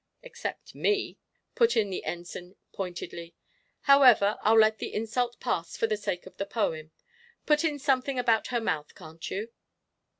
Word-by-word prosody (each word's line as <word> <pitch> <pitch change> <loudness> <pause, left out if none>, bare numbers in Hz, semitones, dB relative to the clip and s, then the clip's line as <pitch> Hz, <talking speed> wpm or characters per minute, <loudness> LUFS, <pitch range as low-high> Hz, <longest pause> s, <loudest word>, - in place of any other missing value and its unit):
"Except 485 -1 -7
me," 415 -1 0 0.3
put 465 -1 +3
in 205 -3 +2
the 185 - -4
Ensign, 175 +1 -6 0.2
pointedly. 175 -2 -6 0.5
"However, 250 -7 +6
I'll 220 +1 +4
let 220 0 +5
the - - -4
insult 235 +3 -1
pass 170 -1 -2
for - - +2
the 220 -1 0
sake 185 -4 -4
of 185 - -14
the 195 - -2
poem. 160 -8 -2 0.6
Put 300 +1 +3
in 305 -3 0
something 270 -1 0
about 230 -3 +2
her 240 - 0
mouth, 150 -9 -3
can't 160 -2 -9
you?" 215 +4 -4
220 Hz, 160 wpm, -28 LUFS, 180-255 Hz, 0.6 s, However